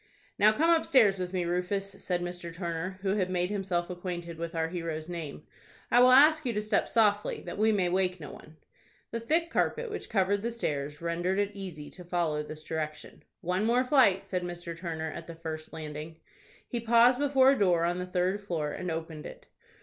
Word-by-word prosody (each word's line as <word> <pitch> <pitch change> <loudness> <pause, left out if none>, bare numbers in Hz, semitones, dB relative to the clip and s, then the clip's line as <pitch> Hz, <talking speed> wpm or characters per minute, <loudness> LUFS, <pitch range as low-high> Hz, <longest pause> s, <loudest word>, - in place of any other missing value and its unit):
"Now 210 +1 +7
come 320 +10 +2
upstairs 250 - +4
with 180 -1 -3
me, 180 -2 -1
Rufus," 180 +3 -1
said 175 -1 -1
Mr. 175 -1 -5
Turner, 170 +2 -4
who 195 -1 +1
had 185 -2 0
made 180 +1 0
himself 185 -4 -1
acquainted 175 -2 -6
with 170 +1 -5
our 160 0 0
hero's 165 -2 -4
name. 165 -4 -6 0.5
"I 240 - +6
will 250 +1 +7
ask 305 +5 +7
you 245 -3 -1
to 210 - -1
step 215 - +1
softly, 210 -2 +2
that - - -7
we 220 +1 +4
may 195 -4 +2
wake 185 0 0
no 150 - -8
one." 155 +1 -14 0.5
The 230 - -2
thick 325 +8 0
carpet 475 -2 0
which 425 - -6
covered 200 -1 +1
the 235 - -1
stairs 150 -10 -3
rendered 175 +3 -1
it 205 0 +1
easy 180 -7 -8
to 180 - -12
follow 170 -3 -1
this 155 +1 -9
direction. 155 -2 -5 0.2
"One 180 +3 0
more 240 +3 +3
flight," 250 -8 +4
said 180 -1 -2
Mr. 175 -1 -6
Turner, 160 -2 -4
at 165 +1 -8
the 170 - -8
first 160 -1 -6
landing. 155 0 -7 0.5
He 240 - -3
paused 235 +2 +5
before 270 -2 +5
a 275 - 0
door 175 -4 +3
on 175 +1 0
the 180 - -4
third 180 +3 0
floor, 165 -7 -2
and 180 - -4
opened 160 -1 -5
it. - - -12
180 Hz, 205 wpm, -29 LUFS, 165-210 Hz, 0.5 s, Now